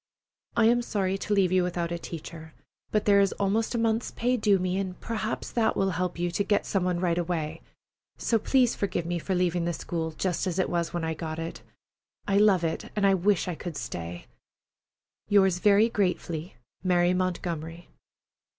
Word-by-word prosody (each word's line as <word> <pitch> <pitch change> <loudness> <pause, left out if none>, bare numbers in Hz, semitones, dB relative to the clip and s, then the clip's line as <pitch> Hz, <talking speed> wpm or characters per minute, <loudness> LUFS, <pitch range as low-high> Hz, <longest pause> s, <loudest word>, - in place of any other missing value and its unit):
I 230 - +5
am 240 +2 +4
sorry 195 -5 -1
to 210 - -1
leave 190 -3 +3
you 185 0 +4
without 175 -1 -2
a 170 - -2
teacher, 160 -1 -8 0.3
but 215 - 0
there 200 -1 +5
is 195 -1 +3
almost 215 +4 0
a - - +1
month's 230 0 +1
pay 245 +2 0
due 210 -4 +3
me, 185 +1 -1
and 185 -2 -4
perhaps 225 -4 -3
that 225 -2 +1
will 195 0 +2
help 180 0 -2
you 175 0 -1
to 200 - 0
get 205 0 +1
some 195 -3 0
one 180 -1 0
right 175 -1 +1
away. 165 -2 -3 0.6
So 225 - +1
please 250 +1 +3
forgive 185 -4 -2
me 175 0 -2
for 190 +3 -2
leaving 175 -1 +1
the 170 - 0
school 165 0 -3
just 185 +3 -1
as 180 -1 -2
it 185 - 0
was 170 -1 -1
when 175 -1 -3
I 160 0 -1
got 160 0 -5
it. 165 0 -5 0.7
I 200 -1 +2
love 200 -4 +4
it, 160 -1 -2
and 195 -3 +2
wish 205 -2 +2
I 180 - -1
could 160 0 -6
stay. 85 -5 -6 1.0
Yours 190 -3 +4
very 210 +2 +5
gratefully, 180 -6 -2 0.3
MARY 180 -1 +3
MONTGOMERY. 170 -2 -3
180 Hz, 190 wpm, -27 LUFS, 170-200 Hz, 1.0 s, I